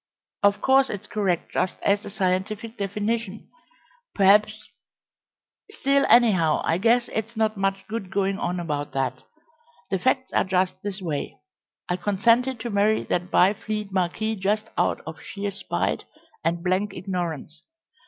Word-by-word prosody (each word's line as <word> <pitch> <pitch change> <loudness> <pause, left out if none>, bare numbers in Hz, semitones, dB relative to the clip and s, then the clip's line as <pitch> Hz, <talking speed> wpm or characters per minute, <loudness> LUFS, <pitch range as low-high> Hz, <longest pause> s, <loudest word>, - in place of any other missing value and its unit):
Of 200 0 +3
course 270 0 +4
it's 205 0 -5
correct 195 -5 -1
just 185 - -1
as 200 +1 +2
a - - -7
scientific 200 +3 -2
definition, 210 +1 -3 0.7
perhaps 210 +2 +3 1.0
still, 280 -10 +2
anyhow, 190 -10 +4
I 165 - +1
guess 235 +3 +3
it's 220 +1 -3
not 220 -1 +1
much 195 0 -1
good 215 -4 -5
going 195 0 0
on 180 0 -2
about 150 -4 -3
that. 135 -2 -2 0.7
The 190 - +1
facts 260 +4 0
are - - +3
just 185 -1 0
this 200 -1 -5
way. 150 -5 -3 0.5
I 180 - -1
consented 230 +7 +2
to 235 - -4
marry 205 +2 +2
that 180 +1 0
Byfleet 210 +2 +1
marquis 195 +4 -1
just 210 +3 -1
out - - +1
of - - -8
sheer 200 -1 -4
spite 195 - -2 0.4
and 170 0 -1
blank 190 +2 0
ignorance. 170 -4 -4
200 Hz, 145 wpm, -24 LUFS, 185-220 Hz, 1.0 s, course